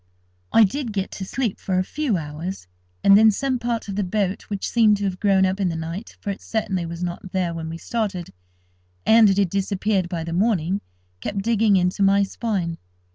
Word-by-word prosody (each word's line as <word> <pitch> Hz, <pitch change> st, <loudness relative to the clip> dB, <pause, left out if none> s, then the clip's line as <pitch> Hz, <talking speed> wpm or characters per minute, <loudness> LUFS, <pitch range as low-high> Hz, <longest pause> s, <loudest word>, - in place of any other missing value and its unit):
I 225 Hz, -, +7 dB
did 235 Hz, +2 st, -1 dB
get 195 Hz, -1 st, -2 dB
to 190 Hz, -, -6 dB
sleep 235 Hz, 0 st, -2 dB
for 185 Hz, -1 st, -1 dB
a 185 Hz, -, +2 dB
few 270 Hz, -1 st, -1 dB
hours, 160 Hz, -, -6 dB, 0.4 s
and 195 Hz, -, +7 dB
then 220 Hz, +2 st, +7 dB
some 260 Hz, +4 st, 0 dB
part 235 Hz, -2 st, -2 dB
of 200 Hz, -, -4 dB
the 205 Hz, -, 0 dB
boat 195 Hz, 0 st, -1 dB
which 200 Hz, -2 st, -3 dB
seemed 220 Hz, -3 st, +4 dB
to 205 Hz, -, -5 dB
have 190 Hz, -2 st, -2 dB
grown 195 Hz, -2 st, +3 dB
up 190 Hz, +1 st, -1 dB
in 190 Hz, -3 st, +1 dB
the 165 Hz, -, -3 dB
night—for 170 Hz, +6 st, -5 dB
it 195 Hz, -, -7 dB
certainly 195 Hz, -6 st, -2 dB
was 170 Hz, +1 st, -5 dB
not 180 Hz, +2 st, -5 dB
there 180 Hz, -3 st, 0 dB
when 160 Hz, -1 st, -5 dB
we 165 Hz, -, -5 dB
started, 195 Hz, -3 st, -3 dB, 0.7 s
and 225 Hz, -1 st, +7 dB
it 195 Hz, -, +2 dB
had 195 Hz, -4 st, +2 dB
disappeared 195 Hz, -1 st, 0 dB
by 170 Hz, -3 st, -3 dB
the 165 Hz, 0 st, -5 dB
morning—kept 175 Hz, -, -2 dB
digging 220 Hz, -2 st, +3 dB
into 180 Hz, +2 st, +1 dB
my 200 Hz, +1 st, +5 dB
spine. 190 Hz, -5 st, -2 dB
195 Hz, 200 wpm, -23 LUFS, 180-215 Hz, 0.7 s, I